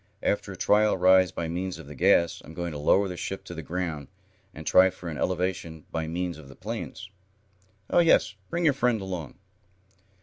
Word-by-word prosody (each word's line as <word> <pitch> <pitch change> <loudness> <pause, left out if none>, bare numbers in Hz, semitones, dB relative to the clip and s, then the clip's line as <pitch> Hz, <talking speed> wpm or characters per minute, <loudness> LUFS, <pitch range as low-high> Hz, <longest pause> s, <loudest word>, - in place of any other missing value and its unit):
After - - 0
a - - -7
trial 105 -1 +3
rise 95 -1 +5
by 85 - -4
means 90 +2 -3
of - - -10
the 75 - -10
gas, 85 +4 +3
I'm 80 - -12
going 85 0 -3
to 75 - -6
lower 95 +7 +3
the 90 - -5
ship 95 +2 -5
to - - -9
the 80 - -6
ground, 80 -3 -4 0.4
and 80 - -10
try 95 +4 +6
for 90 -1 -8
an 75 - -5
elevation 90 -3 -2
by 80 -1 -2
means 85 0 -3
of 75 - -13
the 70 - -13
planes. 95 - -6 0.8
Oh, - - +3
yes, 165 - +4 0.2
bring 170 0 -1
your 150 - +5
friend 125 -4 +1
along." 90 -7 -6
90 Hz, 200 wpm, -27 LUFS, 80-95 Hz, 0.8 s, try